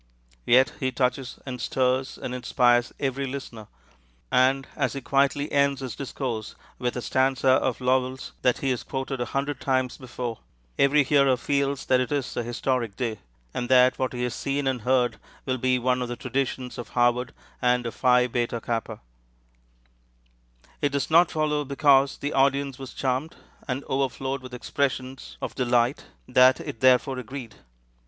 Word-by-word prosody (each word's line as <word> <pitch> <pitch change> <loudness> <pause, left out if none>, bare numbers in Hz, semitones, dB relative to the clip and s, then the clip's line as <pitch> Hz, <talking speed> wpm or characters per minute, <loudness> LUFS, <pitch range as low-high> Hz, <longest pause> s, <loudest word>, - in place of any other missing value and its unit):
Yet 130 +1 +5
he 130 -1 0
touches 125 0 -1
and 125 -3 -6
stirs 130 +2 0
and 125 - -5
inspires 120 -1 +2
every 135 0 -1
listener; 125 -5 -7 0.6
and 135 +1 +3
as 140 -5 0
he 140 - -5
quietly 140 +2 +1
ends 140 -1 +2
his 130 -4 -5
discourse 125 -5 -4 0.2
with 125 -1 -2
a 125 - -4
stanza 130 0 +1
of 130 -1 +2
Lowell's 130 0 0
that 125 -1 +2
he 135 - +2
has 125 - -1
quoted 135 -1 -4
a - - 0
hundred 140 +4 -2
times 130 -2 0
before, 120 -2 -5 0.4
every 145 +1 +5
hearer 140 -2 +3
feels 140 +2 -1
that 130 - +3
it 125 - -2
is 140 -3 -2
a - - 0
historic 120 -2 -2
day, 115 -2 -3 0.3
and 120 - -3
that 125 0 +5
what 130 -2 -1
he 125 0 -3
has 125 - -1
seen 140 0 -2
and 130 -3 0
heard 125 0 +2 0.3
will 130 -1 -1
be 130 +1 +2
one 125 +1 +1
of 125 - -2
the 120 - -4
traditions 130 -1 -3
of 120 - -7
Harvard 120 +1 +2 0.3
and 125 -1 +2
of 115 - -3
Phi 125 -1 +4
Beta 120 -1 -1
Kappa. 115 0 -4 1.8
It 145 - +2
does 140 +2 -1
not 170 +1 +6
follow, 150 -1 0
because 140 -1 +3
the 145 - -3
audience 135 -1 +1
was 130 -3 -9
charmed, 135 +4 -2 0.3
and 130 +1 -2
overflowed 135 0 -2
with 125 -1 -9
expressions 130 0 -3
of - - -3
delight, 125 0 +1 0.2
that 130 +1 +5
it 115 - -7
therefore 130 +1 +3
agreed. 125 -3 -7
130 Hz, 165 wpm, -25 LUFS, 125-135 Hz, 1.8 s, not